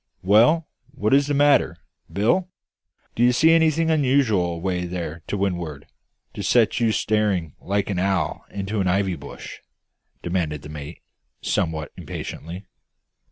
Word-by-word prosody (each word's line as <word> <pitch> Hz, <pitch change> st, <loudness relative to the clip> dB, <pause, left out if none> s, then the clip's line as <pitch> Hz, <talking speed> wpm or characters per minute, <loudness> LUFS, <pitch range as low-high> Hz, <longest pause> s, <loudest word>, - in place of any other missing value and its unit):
"Well, 120 Hz, -, +4 dB, 0.2 s
what 110 Hz, -4 st, -1 dB
is 140 Hz, +1 st, +4 dB
the 145 Hz, -, 0 dB
matter, 140 Hz, -11 st, +3 dB, 0.3 s
Bill? 175 Hz, -, +1 dB, 0.6 s
Do -, -, -3 dB
you 120 Hz, +1 st, +6 dB
see 160 Hz, +6 st, +4 dB
anything 165 Hz, 0 st, +3 dB
unusual 130 Hz, -, +2 dB
away 90 Hz, +1 st, -2 dB
there 85 Hz, -2 st, -5 dB
to 105 Hz, -, -2 dB
wind'ard, 85 Hz, -7 st, -3 dB, 0.5 s
to -, -, -6 dB
set 115 Hz, +4 st, +3 dB
you 115 Hz, -2 st, +2 dB
staring 105 Hz, -8 st, 0 dB
like 100 Hz, +1 st, -1 dB
an 90 Hz, -, -1 dB
owl 95 Hz, -5 st, 0 dB
in 100 Hz, -1 st, -5 dB
an 100 Hz, -2 st, -1 dB
ivy 95 Hz, 0 st, +1 dB
bush?" 70 Hz, -2 st, -10 dB, 0.6 s
demanded 85 Hz, -5 st, -2 dB
the 75 Hz, -, -9 dB
mate, 75 Hz, -2 st, -9 dB, 0.4 s
somewhat 80 Hz, -2 st, -1 dB
impatiently. 90 Hz, +5 st, -7 dB
100 Hz, 140 wpm, -23 LUFS, 85-125 Hz, 0.6 s, you